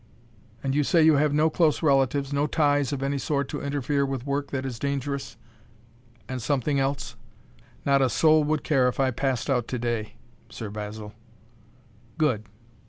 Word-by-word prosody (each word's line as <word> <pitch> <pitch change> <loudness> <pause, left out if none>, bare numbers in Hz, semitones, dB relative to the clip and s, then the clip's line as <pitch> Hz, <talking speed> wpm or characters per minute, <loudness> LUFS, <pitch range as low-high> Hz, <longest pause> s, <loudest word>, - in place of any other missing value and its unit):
"And 135 -1 -1
you 145 +1 +2
say 165 +2 +3
you 155 -2 +6
have 150 0 +2
no 155 +2 +2
close 155 -6 +2
relatives, 140 -1 +2
no 145 +1 +1
ties 145 -3 +2
of 135 -1 -3
any 140 0 -1
sort 140 0 -1
to - - -4
interfere 140 0 -1
with 135 -2 -3
work 140 0 -2
that 135 -1 -3
is 125 -4 -5
dangerous 140 0 -3 0.9
and 130 -1 -4
something 140 +2 0
else?" 135 -3 -2 0.7
"Not 140 -1 +4
a 130 - +3
soul 155 +4 +4
would 155 0 0
care 135 -4 +3
if 125 - -2
I 135 -1 +2
passed 130 0 -1
out 125 -5 0
to 125 - -3
day, 115 -3 -3 0.3
Sir 110 -3 -7
Basil." 105 0 -7 1.0
"Good! 130 -10 +1
140 Hz, 170 wpm, -26 LUFS, 125-145 Hz, 1.0 s, you